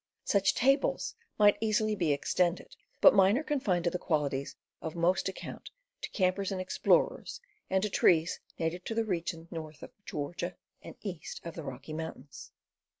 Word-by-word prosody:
Such 195 -1 +2
tables 275 +3 +2 0.2
might 205 -1 +5
easily 215 -1 +2
be 170 -7 +1
extended, 175 +5 0 0.3
but - - +9
mine 195 +2 +5
are 300 - -1
confined 225 - 0
to 170 - +1
the 180 - -2
qualities 140 -4 -1 0.3
of 160 - -5
most 180 +3 +2
account 190 - -8 0.3
to - - -4
campers 190 0 0
and 190 - -2
explorers, 185 0 +1 0.3
and 190 0 +2
to 210 - +1
trees 165 -2 +3 0.2
native 170 +2 -2
to 225 - -3
the 230 0 +1
region 170 -4 -3
north 155 -3 -7
of - - -9
Georgia 170 +4 -4 0.3
and - - -10
east 185 -6 -6
of 170 - -5
the 165 - -6
Rocky 140 +2 -7
Mountains. 155 -3 -7
180 Hz, 165 wpm, -31 LUFS, 160-200 Hz, 0.3 s, but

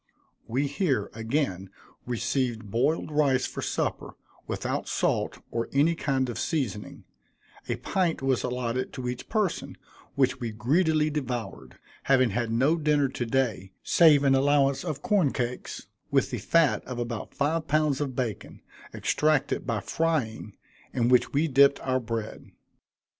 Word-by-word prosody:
We 130 +5 0
here, 140 - -1
again, 110 -5 -2 0.4
received 120 -2 -2
boiled 150 +8 0
rice 140 -4 +2
for - - -5
supper, - - -2 0.3
without - - -3
salt, - - 0
or 115 0 -2
any 145 +5 +3
kind 135 -5 0
of 120 - -5
seasoning; 125 - -3 0.7
a - - +1
pint 180 -4 -1
was 135 -2 +1
allotted 125 0 -2
to 125 -1 -5
each 125 0 -5
person, 215 -5 -1 0.4
which 130 -2 +2
we 115 -3 -4
greedily 155 +6 +2
devoured, 120 - -5 0.3
having 130 -4 +4
had 115 +2 -1
no 135 +8 +3
dinner 150 -3 +2
to 125 -2 -3
day, 115 -7 -1
save 155 -4 +5
an 135 -1 +4
allowance 140 0 +3
of 145 -1 -4
corn 190 -10 +2
cakes, 125 0 -4 0.2
with - - +1
the - - -3
fat 165 -4 +2
of 125 -1 -6
about 120 -2 -5
five 155 +3 0
pounds 150 -2 +1
of 135 -3 -3
bacon, 120 -6 -4 0.3
extracted 155 -2 +1
by 115 -3 -1
frying, 125 -9 -2 0.4
in 120 -1 +1
which 125 -1 +4
we 150 +3 +2
dipped 140 0 +5
our 130 -1 0
bread. 115 -2 -5
130 Hz, 145 wpm, -27 LUFS, 120-150 Hz, 0.7 s, save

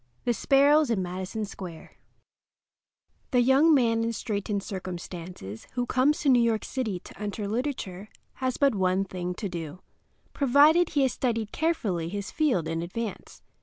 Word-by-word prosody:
THE 240 - +2
SPARROWS 285 +4 +4
IN 205 -5 +1
MADISON 185 +4 -4
SQUARE 180 -5 -9 1.4
The 250 -3 +3
young 270 +6 +5
man 230 -5 +3
in 230 0 -1
straitened 205 -3 -3
circumstances 175 - -7
who 245 -1 -1
comes 265 +5 +2
to 285 - +2
New 250 -2 +6
York 230 -2 +1
City 220 -9 -3
to - - -13
enter 205 0 -3
literature 215 -5 -3 0.3
has 255 -1 0
but 280 -3 +3
one 190 -1 +1
thing 180 -1 -4
to 200 - -4
do, 170 -1 -6 0.5
provided 295 +5 +5
he 285 -4 +2
has 260 -4 +1
studied 230 -4 -1
carefully 205 - -1
his 200 +1 -5
field 260 - +1
in 165 0 -2
advance. 205 +5 -6
220 Hz, 155 wpm, -27 LUFS, 185-260 Hz, 1.4 s, New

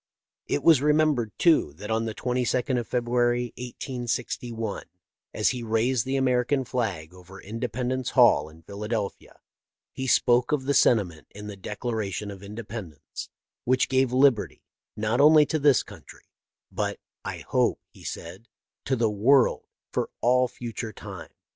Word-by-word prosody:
It 75 - -1
was 160 -5 +6
remembered, 150 -6 +2
too, 160 - +3
that 105 +8 -7
on 110 0 +1
the 110 -1 -4
22d 125 0 0
of 120 - -6
Feb 125 -1 0
ruary, 120 0 +1
1861, 120 -3 -4 0.5
as 105 - +1
he 125 -1 -3
raised 115 +2 +1
the 135 - 0
American 130 +1 +1
flag 100 -11 -3
over 90 +1 -13
Independence 125 +4 -3
Hall, 115 - +5
in 80 +1 -17
Philadelphia, 105 0 -5 0.6
he 130 - -4
spoke 120 -1 +3
of 150 -3 +1
the 140 +2 0
sentiment 95 - +2
in 105 +1 -10
the 105 -1 -7
Declaration 105 0 -4
of 95 -1 -10
Independence 100 -6 -8 0.3
which 130 +1 +2
gave 130 -1 +2
liberty 125 - +2 0.3
not 110 +4 +1
only 150 0 +7
to 155 +2 -1
this 140 -2 +4
country, - - -14 0.5
but, - - -2
" - - -66
I - - -6
hope," - - +2
he - - -16
said, 95 +7 -7 0.4
"to 130 - +1
the 115 -2 +2
world 125 +6 +3 0.2
for - - -1
all 125 +1 +3
future 115 -2 -6
time. - - -9
120 Hz, 150 wpm, -26 LUFS, 105-130 Hz, 0.6 s, only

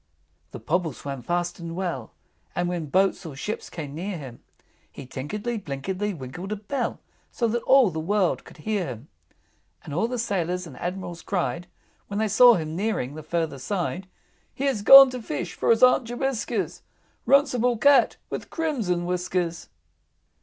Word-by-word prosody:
III. - - -43
The - - -6
Pobble 165 -1 0
swam 140 0 -6
fast 175 +7 -2
and 170 -1 -6
well, 170 -11 -3 0.4
And 175 0 0
when 175 -3 -3
boats 190 +5 +2
or 160 -5 -8
ships 210 +10 -5
came 150 -5 -7
near 180 +4 -4
him, 130 -6 -10 0.5
He 140 - -10
tinkledy 205 - -4
binkledy 185 +7 -3
winkled 160 +9 -7
a - - 0
bell 230 +6 -3 0.3
So 235 - 0
that 235 +2 -1
all 265 -7 +6
the 160 - -4
world 190 +2 +1
could - - -15
hear 210 -5 0
him. 125 +1 -8 0.7
And 145 - -8
all 180 +9 +1
the 250 +1 -3
Sailors 180 -5 -1
and 165 - -11
Admirals 175 -1 -5
cried, 175 -2 -2 0.4
When 200 - -4
they 220 +1 +1
saw 240 +3 +7
him 155 -3 -3
nearing 195 - -1
the 155 - -7
further 160 -2 -2
side, 185 +3 -3 0.4
"He 270 - -6
has 270 -7 +1
gone 270 +4 +10
to 250 -1 -5
fish, 180 -3 -4
for - - -1
his 230 +1 +4
Aunt 250 -1 +6
Jobiska's 240 0 -2 0.5
Runcible 250 -4 +3
Cat 280 -2 +5
with - - -5
crimson 230 - -1
whiskers!" 180 -1 -2
180 Hz, 170 wpm, -25 LUFS, 165-225 Hz, 0.7 s, gone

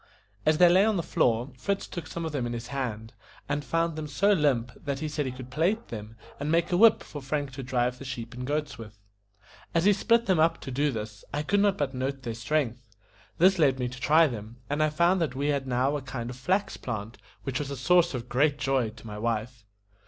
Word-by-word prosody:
As 155 0 +5
they 180 - +7
lay 185 +3 +6
on 215 -1 +2
the 170 - -1
floor, 120 -1 +1
Fritz 200 +8 -1
took 175 - -7
some 170 -1 -5
of 160 - -3
them 135 -5 -2
in 120 - -4
his 120 +1 -6
hand, 115 -5 -4 0.3
and 145 0 -1
found 165 +2 0
them 155 -1 -4
so 200 +8 +2
limp, 135 -8 +1
that 140 -2 -4
he 155 +2 -3
said 150 -2 -2
he - - -2
could 130 0 -10
plait 185 - 0
them, 110 0 -7 0.2
and 145 +2 -2
make 170 +1 +2
a - - +3
whip 225 +2 +6
for 145 - -8
Frank 145 +1 -2
to 135 +1 -7
drive 125 -1 -1
the - - -8
sheep 120 -3 -6
and 125 +1 -6
goats 145 -3 -2
with. 105 -2 -10 0.8
As 165 +1 +3
he 205 - +6
split 230 +3 +2
them 185 -4 +2
up 165 +1 +3
to 135 - -6
do 145 +3 +1
this, 105 -2 -6
I 145 +1 -2
could 200 +7 +2
not 200 -1 +3
but 140 -2 -1
note 135 +1 -3
their 115 -2 -3
strength. 120 -1 -1 0.5
This 190 +2 +5
led 135 -4 +4
me 125 -1 -1
to 125 +1 -10
try 160 +2 +5
them, 115 -4 -5
and 145 +1 0
I 155 - +3
found 170 +4 +2
that 150 -6 -1
we 140 +2 0
had 140 -2 0
now 130 +3 +1
a 145 - -2
kind 130 -3 -5
of - - -8
flax 185 +11 0
plant, 110 -2 -5 0.2
which 130 +1 -2
was 145 -2 -3
a 140 - -5
source 175 +3 +3
of 120 -1 -5
great 145 +4 +2
joy 135 -5 +1
to 115 +2 -14
my 105 -1 -7
wife. 115 0 -3
140 Hz, 245 wpm, -27 LUFS, 125-160 Hz, 0.8 s, they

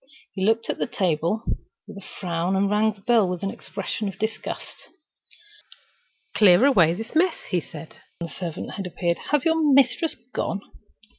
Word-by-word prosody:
He 190 - -3
looked 225 +3 +2
at - - -3
the - - 0
table 180 0 0 0.4
with - - -10
a 200 - -9 0.2
frown, 175 0 -1
and 200 +1 +1
rang 215 +1 +3
the 200 - -22
bell 220 -3 +3
with 180 0 -4
an 195 - -1
expression 200 +2 -5
of 195 - -6
disgust. 220 0 -5 1.5
"Clear 205 +2 +6
away 175 - +5
this 225 +4 -7
mess," 335 +2 +3
he 180 -2 +2
said, 155 0 -11 0.2
when 170 - -5
the - - -13
servant 170 -1 -5 0.2
appeared. 175 -1 -1
"Has 295 -3 +2
your 325 0 +3
mistress 275 +4 +3 0.2
gone?" 200 - -2
200 Hz, 165 wpm, -24 LUFS, 175-225 Hz, 1.5 s, Clear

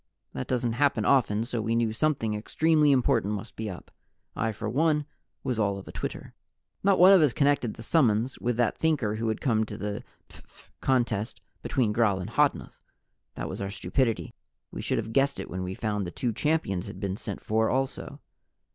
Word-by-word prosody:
That 65 - -4
doesn't 120 -2 0
happen 125 -4 +1
often, 115 -5 +3
so 120 -2 -2
we 115 +1 0
knew 115 -2 +1
something 115 -4 0
extremely 150 +7 +2
important 120 -5 +2
must 105 +3 -8
be 110 -1 -4
up. 90 - -9 0.4
I 115 0 0
for 105 - -5
one 150 +1 +2 0.4
was 125 -3 -1
all 100 -2 +1
of 95 - -10
a - - -7
twitter. - - -6 0.5
Not 195 0 +4
one 185 +2 +8
of 190 - +7
us 145 -6 +3
connected 140 -6 +1
the 115 - -9
summons 120 -3 +2
with 120 -1 -1
that 120 -2 +2
Thinker 130 -10 0
who 115 +1 -2
had 110 - -2
come 110 -5 +2
to - - -7
the 105 0 -4 0.2
phph - - -17
contest 120 -4 0 0.2
between 115 -6 0
Gral 105 -4 +2
and 90 - -5
Hodnuth. - - 0 0.5
That - - -4
was - - -6
our 100 - -2
stupidity. 115 +3 -1 0.4
We - - -6
should - - -1
have 110 - -3
guessed 140 +2 +2
it - - -6
when 90 +1 -3
we 90 +1 -4
found 105 -3 -2
the - - -3
two 120 +5 -2
champions 110 - 0
had 95 - -8
been 95 -2 -2
sent 100 -1 -6
for 110 +1 +1
also. 135 0 -2
115 Hz, 200 wpm, -27 LUFS, 105-135 Hz, 0.5 s, one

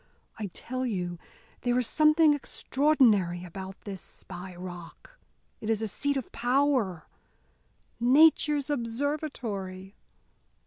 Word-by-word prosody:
I 210 - -2
tell 255 +7 -5
you 180 -7 -2 0.4
there 245 0 +1
is 250 - +2
something 305 +3 +5
extraordinary 245 - +2
about 190 +2 -8
this 195 -3 -7
Spy 180 0 -9
Rock. 175 - -10 0.4
It 220 - -5
is 225 0 +1
a - - 0
seat 285 +7 -1
of 260 - -5
power 245 - +1 0.9
Nature's 295 +3 +4
observatory. 230 -8 -3
235 Hz, 105 wpm, -28 LUFS, 190-285 Hz, 0.9 s, something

